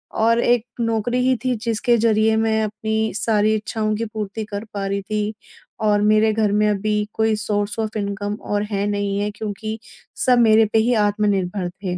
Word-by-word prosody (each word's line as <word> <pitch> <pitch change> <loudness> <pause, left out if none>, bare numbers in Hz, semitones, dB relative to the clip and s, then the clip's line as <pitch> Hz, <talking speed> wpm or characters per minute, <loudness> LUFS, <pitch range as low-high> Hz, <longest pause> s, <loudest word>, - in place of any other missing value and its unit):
और 230 +1 +3
एक 240 -1 +2 0.2
नौकरी 230 +2 0
ही 260 - +3
थी 255 -1 +1
जिसके 235 +1 +1
ज़रिए 220 -1 +3
मैं 220 0 +1
अपनी 220 +1 -2
सारी 215 0 +2
इच्छाओं 215 0 -2
की 230 +2 -2
पूर्ति 215 -1 -5
कर 205 0 -5
पा 200 -1 -3
रही 200 0 -2
थी 210 +1 -2 0.5
और 210 -1 +3
मेरे 215 +1 +4
घर 215 -2 +1
में 210 +1 +2
अभी 210 +1 0 0.2
कोई 220 0 +1
सोर्स 205 0 -2
ऑफ 220 0 -3
इनकम 205 0 -3 0.2
और 205 - +1
है 200 0 0
नहीं 205 -1 -1
है 205 +1 -1
क्योंकि 215 +1 -5 0.5
सब 250 -2 +5
मेरे 220 -1 +5
पे 225 - +5
ही 240 +3 +2
आत्मनिर्भर 200 -3 -1
थे। 180 0 -5
215 Hz, 185 wpm, -21 LUFS, 205-220 Hz, 0.5 s, सब